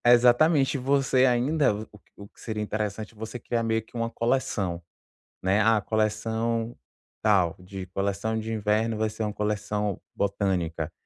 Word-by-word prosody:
Exatamente, 130 +4 +5
você 135 0 +3
ainda, 130 0 +2
o 110 +1 -6
q 105 - -18 0.2
o 100 - -10
que - - -21
seria 110 -2 -3
interessante, 105 +1 -3
você 110 +2 -6
criar 120 -1 -1
meio 115 -1 0
que 110 - -21
uma 115 0 -1
coleção, 115 -8 -1 0.6
né: 95 +3 +3
"Ah, 110 0 +4
coleção 110 +2 -1 0.4
tal, 95 -6 +3
de 95 +1 -8
coleção 100 +4 -1
de 110 +1 -4
inverno 110 +1 +1
vai 110 0 0
ser 110 - -4
uma 105 - -2
coleção 105 -1 -2
botânica", 90 -5 -1
110 Hz, 150 wpm, -26 LUFS, 100-115 Hz, 0.6 s, Exatamente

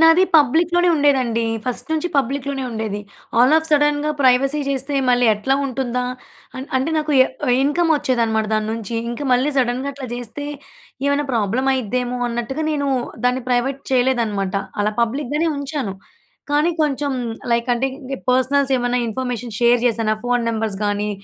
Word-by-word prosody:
నాది 325 +3 +6
పబ్లిక్‌ 320 +4 +3
లోనే 350 0 +4
ఉండేదండి. 260 -5 +2 0.2
ఫస్ట్ 250 +1 -2
నుంచి 315 +3 0
పబ్లిక్‌ 275 +1 0
లోనే 270 -1 -3
ఉండేది. 220 -2 -3 0.4
ఆల్ 255 +5 +5
ఆఫ్ 320 0 0
సడెన్‌గా 295 0 +2
ప్రైవసీ 270 +3 +3
చేస్తే 275 +1 -2
మళ్ళీ 245 -1 +4
ఎట్లా 265 +6 0
ఉంటుందా! 250 -1 -2 0.7
అంటే, 265 +5 0
నాకు 305 -1 -1 0.5
ఇన్‌కమ్ 325 +4 +1
వొచ్చేదనమాట 230 -5 0
దాని 215 0 -1
నుంచి. 230 0 -5 0.2
ఇంకా 260 +5 -5
మళ్ళీ 255 +4 +2
సడెన్‌గా 255 +2 0
అట్లా 270 -1 -7
జేస్తే 245 +4 -6 0.6
ఏమైనా 285 +1 +1
ప్రాబ్లమ్ 230 +4 0
అయిద్దేమో 250 +1 -2
అన్నట్టుగా 240 +6 -3
నేను 285 -2 -1 0.4
దాన్ని 250 +1 +1
ప్రైవేట్ 260 +3 0
చేయలేదనమాట. 230 -7 +1 0.3
అలా 210 +1 +1
పబ్లిక్‌ 245 +4 -1
గానే 325 +2 +1
ఉంచాను. 280 -8 -3 0.6
కానీ 300 +4 +3
కొంచెం 285 -1 -1 0.4
లైక్ 235 +1 0
అంటే, 265 +3 0 0.4
పర్సనల్స్ 270 +1 +2
ఏమన్నా 245 0 0
ఇన్ఫర్మేషన్ 240 -2 -4
షేర్ 240 +1 +5
చేశానా? 225 -2 +1
ఫోన్ 245 -1 +1
నెంబర్స్ 220 -3 -2
గాని, 205 +1 -1
255 Hz, 145 wpm, -20 LUFS, 235-285 Hz, 0.7 s, నాది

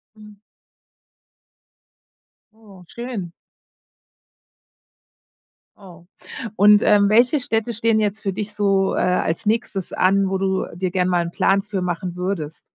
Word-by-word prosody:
Mhm. 210 -1 -15 2.2
Oh, 200 -5 -17
schön. 235 -8 -6 2.5
Oh. 175 -4 -15 0.5
Und, 205 +1 +6
ähm, 205 -1 +4
welche 245 +6 +4
Städte 235 -3 -2
stehen 225 0 +1
jetzt 210 0 -1
für 195 - -2
dich 210 +1 -5
so, 195 -2 +1
äh, - - -3
als 180 +1 0
Nächstes 210 -3 -2
an, 195 +1 +2
wo 190 - -1
du 190 0 -1
dir 180 0 -3
gerne 185 -1 0
mal 175 -1 +2
'n 170 - -6
Plan 195 +2 +2
für 200 -3 -4
machen 175 0 -3
würdest? 180 -4 -4
195 Hz, 125 wpm, -21 LUFS, 185-215 Hz, 2.5 s, Und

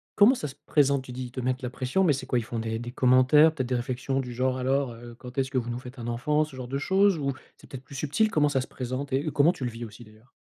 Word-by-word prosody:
comment 220 +6 +6
ça 150 - -4
se 135 - -10
présente? 140 -2 +2
Tu 130 - -10
dis 125 +1 -5
ils 120 - -9
te 130 - -6
mettent 130 +1 -1
la 125 - -3
pression, 130 +9 0
mais 155 -5 +4
c'est 130 -1 -4
quoi? 125 - +1
Ils - - -2
font 115 0 -5
des 115 0 -3
des 120 0 -6
commentaires? 130 +5 +5
Peut-être 130 -6 -3
des 125 - +1
réflexions 130 +2 -2
du 125 -2 -4
genre: 130 +1 0
«Alors, 130 -1 0
heu, 120 0 -11
quand 125 +1 -11
est-ce 130 -1 +1
que 130 - -1
vous 120 -1 -1
nous 120 +1 -3
faites 125 0 -11
un 120 - -5
enfant?», 150 +6 +1
ce 145 -3 -13
genre 125 -1 -6
de 135 +2 -2
chose? 190 +4 +3
Ou 140 -2 -1 0.2
c'est - - -17
peut-être 130 -1 -8
plus 135 +2 -12
subtil, 150 +11 +1
comment 150 -4 +2
ça 135 -2 +1
se 130 - -7
présente, 130 +2 -5
et 140 +3 +1
comment 150 +4 +4
tu 130 - -8
le - - -1
vis 115 +1 -7
aussi, 110 +2 -12
d'ailleurs? 110 +2 -20
130 Hz, 310 wpm, -27 LUFS, 125-140 Hz, 0.2 s, comment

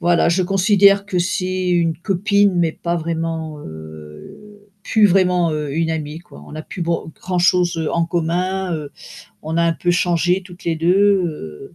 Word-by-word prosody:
voilà, 175 -1 +3
je 185 +2 +1
considère 200 +1 +4
que 185 -3 -1
c'est 185 +1 -1
une 165 -2 +1
copine, 200 +1 +1
mais 165 -2 +1
pas 170 +1 -3
vraiment, 160 -2 -4
heu, 80 - -12
plus 215 -2 +4
vraiment, 180 -3 +2
heu, 150 -2 -3
une 165 -1 0
amie, 155 0 -4
quoi. 75 - -15
On - - -13
n'a 155 0 -6
plus 175 - -6
ban 165 -1 -2
grand-chose 175 -3 +1
en 170 0 +1
commun, 180 +2 -1
heu, 150 -2 -6 0.5
on 160 +1 -4
a 170 - +3
un 170 - +2
peu 175 - -1
changé 175 +1 +1
toutes 180 -1 -14
les 165 -1 0
2, 170 +3 +2 0.3
heu, 80 - -8
175 Hz, 175 wpm, -19 LUFS, 160-185 Hz, 0.5 s, considère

